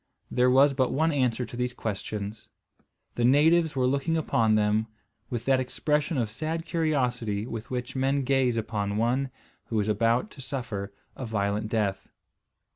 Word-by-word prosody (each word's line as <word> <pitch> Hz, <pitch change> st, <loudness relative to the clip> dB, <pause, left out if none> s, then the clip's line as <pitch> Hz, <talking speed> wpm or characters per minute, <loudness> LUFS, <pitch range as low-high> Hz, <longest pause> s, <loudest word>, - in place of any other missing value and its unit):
There 125 Hz, +1 st, +3 dB
was 135 Hz, +2 st, +5 dB
but 130 Hz, -1 st, +1 dB
one 160 Hz, +4 st, +2 dB
answer 125 Hz, -4 st, +1 dB
to 115 Hz, -, -10 dB
these 125 Hz, 0 st, -2 dB
questions. 105 Hz, 0 st, -5 dB, 0.6 s
The 120 Hz, -, -1 dB
natives 155 Hz, +5 st, +4 dB
were 130 Hz, -1 st, +2 dB
looking 140 Hz, +5 st, +1 dB
upon 115 Hz, -8 st, +2 dB
them 105 Hz, +1 st, +2 dB, 0.4 s
with 120 Hz, -3 st, -4 dB
that 135 Hz, -1 st, +3 dB
expression 150 Hz, +4 st, 0 dB
of 115 Hz, -4 st, -1 dB
sad 160 Hz, +6 st, -3 dB
curiosity 125 Hz, -, 0 dB
with 115 Hz, -2 st, -6 dB
which 125 Hz, 0 st, -4 dB
men 135 Hz, +1 st, +1 dB
gaze 130 Hz, -2 st, +2 dB
upon 105 Hz, -2 st, -2 dB
one 125 Hz, +4 st, +1 dB, 0.4 s
who 110 Hz, -, -1 dB
is 105 Hz, -, 0 dB
about 115 Hz, -, +1 dB
to 140 Hz, -, -11 dB
suffer 115 Hz, -7 st, -4 dB, 0.2 s
a 130 Hz, -, -5 dB
violent 105 Hz, 0 st, -1 dB
death. 100 Hz, -4 st, -1 dB
125 Hz, 160 wpm, -27 LUFS, 110-135 Hz, 0.6 s, was